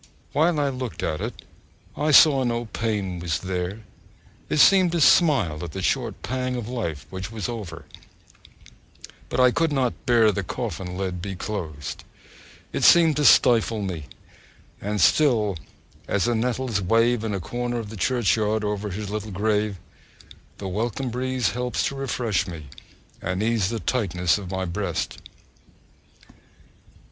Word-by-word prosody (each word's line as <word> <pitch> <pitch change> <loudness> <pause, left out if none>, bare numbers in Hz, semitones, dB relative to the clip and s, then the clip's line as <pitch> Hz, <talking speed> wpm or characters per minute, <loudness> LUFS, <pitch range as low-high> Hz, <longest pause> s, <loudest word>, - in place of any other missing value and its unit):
While 160 +2 +2
I 145 -1 +1
looked 130 -3 -5
at 80 -1 -2
it, - - -5 0.5
I 150 +2 0
saw 145 -2 +7
no 120 -1 -1
pain 105 -5 -3
was 85 -3 -1
there; 95 +3 -3 0.7
it - - 0
seemed 185 +3 +6
to 170 - +1
smile 130 - +4
at 85 -4 -7
the - - -4
short - - -1
pang 130 0 -2
of 120 -3 -4
life 105 - -4
which 95 +2 -6
was 110 -4 -4
over: 90 -10 -7 1.4
but - - -2
I 125 -1 +6
could 165 +4 +1
not 130 -4 -1
bear 115 -3 +5
the 100 - -2
coffin 95 -4 -5
lid 90 -2 -3
to 100 - -5
be 95 - -4
closed 80 -8 -5 0.7
it - - -2
seemed 165 -3 +6
to 150 - +1
stifle 115 -4 +5
me; 85 -6 -4 0.8
and 105 +1 -2
still 110 - +3 0.5
as 100 - +1
the 120 - +1
nettles 120 -2 -1
wave 115 +4 +2
in 110 -3 -2
a - - -2
corner 120 +6 -3
of 110 -3 -5
the - - -7
churchyard 110 -2 +1
over 105 0 -2
his 100 +1 -5
little 105 0 -4
grave, 105 0 0 0.8
the 100 - -6
welcome 115 +6 -2
breeze 130 -1 -1
helps 125 +3 -2
to 140 - -2
refresh 125 -6 -1
me, 80 -6 -8 0.5
and 90 +3 -2
ease 110 -4 +1
the 115 - -3
tightness 95 -7 0
at 95 -3 -8
my 95 0 -2
breast! 85 -1 -3
110 Hz, 155 wpm, -24 LUFS, 95-125 Hz, 1.4 s, saw